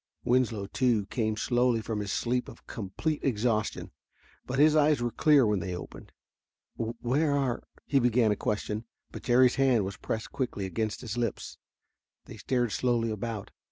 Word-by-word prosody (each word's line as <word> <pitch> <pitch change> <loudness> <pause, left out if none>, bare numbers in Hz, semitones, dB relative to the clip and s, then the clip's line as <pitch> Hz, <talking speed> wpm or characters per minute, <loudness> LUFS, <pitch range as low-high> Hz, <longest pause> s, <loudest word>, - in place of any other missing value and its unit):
Winslow, 120 -5 +1
too, 115 -1 +1
came 110 -3 -1
slowly 120 0 +2
from 110 -1 -3
his 100 -2 -3
sleep 125 +1 -1
of - - -14
complete 115 +9 -3
exhaustion, 110 -3 0 0.6
but 130 - -2
his 150 +2 +5
eyes 150 -2 +4
were 120 0 -1
clear 150 -2 +5
when 105 -2 +1
they 90 0 -4
opened. 90 - -10 0.6
"Where 125 +6 0
are 130 -4 0
" - - -27
he 140 - +3
began 120 -3 +3
a - - +2
question, 105 +2 -2 0.3
but - - -8
Jerry's 125 0 +4
hand 125 -7 +3
was 95 +1 -5
pressed 110 -1 -4
quickly 125 -7 -3
against 105 +4 -3
his 115 -1 -5
lips. 120 -3 -3 0.7
They - - -10
stared 120 -3 0
slowly 120 -2 +1
about. 110 -1 -5
120 Hz, 165 wpm, -29 LUFS, 105-130 Hz, 0.7 s, his